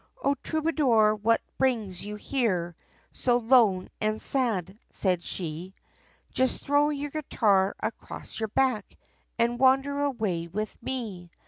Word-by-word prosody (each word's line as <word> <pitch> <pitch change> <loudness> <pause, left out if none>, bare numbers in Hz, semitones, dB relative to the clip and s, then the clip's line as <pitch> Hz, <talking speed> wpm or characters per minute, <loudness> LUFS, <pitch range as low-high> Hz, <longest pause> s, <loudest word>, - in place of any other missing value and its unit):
"O 280 - +3
troubadour, 290 -9 +2
what 215 +2 +2 0.2
brings 220 -9 0
you 210 +1 -6
here, 195 -8 -1 0.4
So 245 -1 +2
lone 225 -6 +4
and 215 0 0
sad?" 210 -7 0
said 180 -3 0
she, 175 +2 -5 0.6
Just 260 0 0
throw 290 +1 +3
your 290 -1 -3
guitar 205 -10 +1
across 220 - -6
your 220 -1 -2
back, 250 -3 0 0.4
And 235 +1 +1
wander 270 +2 +3
away 215 -12 -1
with 210 +5 -4
me. 220 -9 -5
225 Hz, 125 wpm, -27 LUFS, 195-265 Hz, 0.6 s, lone